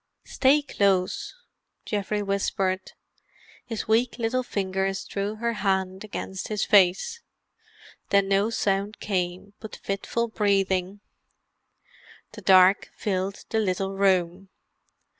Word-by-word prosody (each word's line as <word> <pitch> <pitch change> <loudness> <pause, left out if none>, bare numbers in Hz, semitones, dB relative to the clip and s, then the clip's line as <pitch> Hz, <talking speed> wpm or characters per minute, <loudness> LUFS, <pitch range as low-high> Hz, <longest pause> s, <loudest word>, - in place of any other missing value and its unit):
"Stay 285 +2 +3
close," 195 - 0 0.5
Geoffrey 205 0 -2
whispered. 195 -1 -1 0.7
His 225 -2 -5
weak 230 +3 +2
little 240 +2 0
fingers 195 -4 -2
drew 200 +1 -3
her 235 +1 -1
hand 190 -2 -1
against 190 -2 -6
his 210 -2 -1
face. 205 - +3 0.9
Then 200 -1 +3
no 200 +2 +2
sound 200 -1 -1
came 185 0 -3
but 220 - -8
fitful 215 +4 -2
breathing. 195 -2 0 1.3
The - - -11
dark 185 0 +5
filled 195 -1 -3
the 220 - 0
little 195 -1 -1
room. 190 -1 +1
195 Hz, 105 wpm, -25 LUFS, 190-215 Hz, 1.3 s, dark